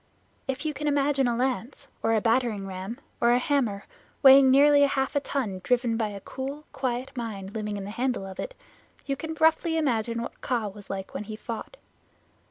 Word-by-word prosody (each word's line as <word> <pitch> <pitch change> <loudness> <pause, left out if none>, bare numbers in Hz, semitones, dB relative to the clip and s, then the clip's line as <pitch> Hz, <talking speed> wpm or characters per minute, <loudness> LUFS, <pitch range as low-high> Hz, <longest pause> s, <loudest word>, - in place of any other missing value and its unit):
If 270 +3 -3
you 305 - 0
can 295 +2 -3
imagine 280 -2 +2
a 240 - +1
lance, 255 +1 -2
or 225 0 +2
a 215 - +2
battering 225 -3 +1
ram, 190 +6 -6 0.2
or 235 0 +5
a - - +5
hammer 245 -7 0 0.4
weighing 270 0 +9
nearly 285 +2 +6
half 275 0 +2
a - - +4
ton 235 -10 -3
driven 240 +2 +1
by 225 -1 0
a 200 -1 -7
cool, 270 +7 -6
quiet 260 +1 -3
mind 205 -5 -5
living 210 -2 -3
in 200 - -5
the 200 - -6
handle 245 -2 -1
of 190 -1 -9
it, - - -5 0.5
you 275 - -1
can 320 +2 -6
roughly 325 +1 +3
imagine 235 -6 0
what - - -8
Kaa 235 -5 -1
was 205 0 -13
like 195 -1 -5
when 210 - -4
he 215 +1 -6
fought. 230 - -7
245 Hz, 195 wpm, -27 LUFS, 215-275 Hz, 0.5 s, weighing